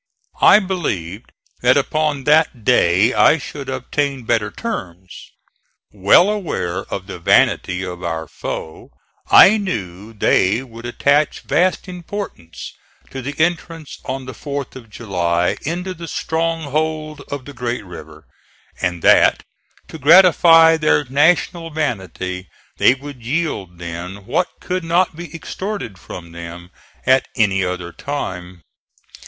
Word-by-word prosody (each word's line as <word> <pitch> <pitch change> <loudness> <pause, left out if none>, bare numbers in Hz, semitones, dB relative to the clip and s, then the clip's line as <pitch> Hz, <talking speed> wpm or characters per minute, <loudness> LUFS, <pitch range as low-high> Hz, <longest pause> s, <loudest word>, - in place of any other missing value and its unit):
I - - +8
believed 130 - -3 0.3
that 125 +3 +4
upon 150 0 0
that 150 -5 +2
day 105 -1 +3
I 160 - +5
should 140 -2 -8
obtain 130 +1 -2
better 110 -2 0
terms. 95 - -6 0.8
Well 105 - +5
aware 100 - -3
of 95 - -4
the 95 -3 -8
vanity 90 +2 +2
of 90 -1 -7
our 80 -2 -3
foe, 80 - -7 0.4
I 215 +3 +8
knew 105 - -5
they 105 +2 +2
would 115 -2 -10
attach 145 +5 +1
vast 185 +3 0
importance 180 - -7 0.4
to 135 - -6
the 145 +3 -5
entrance 165 -2 -2
on 130 0 -5
the 130 - -7
4th 140 +2 -6
of 120 -4 -12
July 90 -3 -1
into 180 +3 -3
the 170 -1 -9
stronghold 155 -2 -2
of 140 -2 -6
the 145 - -10
great 120 -4 -4
river, 80 -3 -12 0.6
and 90 -2 -2
that, - - +5 0.5
to 160 - -9
gratify 165 0 +7
their 155 -1 +2
national 165 +5 +1
vanity, 95 - -4 0.3
they 125 - +5
would 135 -2 -11
yield 120 - -3
then 90 +3 -7
what 175 - 0
could 185 0 -3
not 170 +1 +1
be 175 +1 -9
extorted 185 - -6
from 85 -2 -10
them 85 +1 -9 0.3
at 130 0 +3
any 100 -5 +2
other 90 -1 -4
time." 90 - -6
130 Hz, 130 wpm, -19 LUFS, -, 0.8 s, I